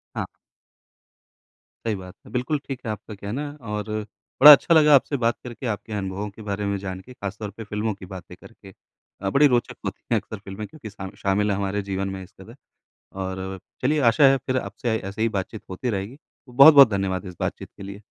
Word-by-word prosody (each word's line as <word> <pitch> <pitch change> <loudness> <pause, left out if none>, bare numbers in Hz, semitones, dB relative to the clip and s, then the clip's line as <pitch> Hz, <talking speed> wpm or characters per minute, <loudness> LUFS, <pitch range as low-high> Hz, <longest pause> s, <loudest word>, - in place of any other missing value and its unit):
हाँ। - - -2 1.6
सही 110 -2 0
बात 90 -1 -10
है। - - -14
बिल्कुल 125 +4 -1
ठीक 135 -3 -4
है 110 - -1
आपका 105 0 -8
कहना। 115 +9 -5
और 105 -2 -5 0.5
बड़ा 150 +2 +13
अच्छा 150 +3 +7
लगा 150 -2 +7
आपसे 140 +1 +2
बात 115 -1 +1
करके 125 +1 -8
आपके 105 +1 -9
अनुभवों 100 0 -3
के 100 +2 -14
बारे 105 -1 -3
में 100 0 -1
जान 95 -1 -6
के, 125 - -14
ख़ास 100 -4 -6
तौर 105 -2 -4
पे 115 - -6
फ़िल्मों 105 +1 -2
की 95 - -11
बातें 95 - -9
करके। 95 - -15 0.5
अ, 95 - -1
बड़ी 140 +8 +5
रोचक 120 -3 0
होती - - -5
है - - +4
अक्सर 110 - -9
फ़िल्में 100 +2 -8
क्योंकि 140 -6 -10
सामि 95 -2 -9
शामिल 105 +2 +1
हैं 100 - 0
हमारे 100 +1 -1
जीवन 95 0 -2
में 95 - -7
इस 95 - -15
कदर। 115 +5 -13 0.7
और 95 0 -4 0.2
चलिए 150 +4 +2
आशा 130 +6 +3
है 135 - +4
फ़िर 130 - 0
आपसे 110 +1 -3
ऐसे 100 +2 -5
ही 115 - +3
बातचीत 100 +3 -6
होती 120 +7 -3
रहेगी। 100 +4 -4 0.3
तो 125 - -15
बहुत-बहुत 140 -1 +9
धन्यवाद 95 -1 -1
इस 90 -1 -9
बातचीत - - -4
के - - -10
लिए। 100 +1 -9
105 Hz, 210 wpm, -24 LUFS, 95-125 Hz, 1.6 s, बड़ा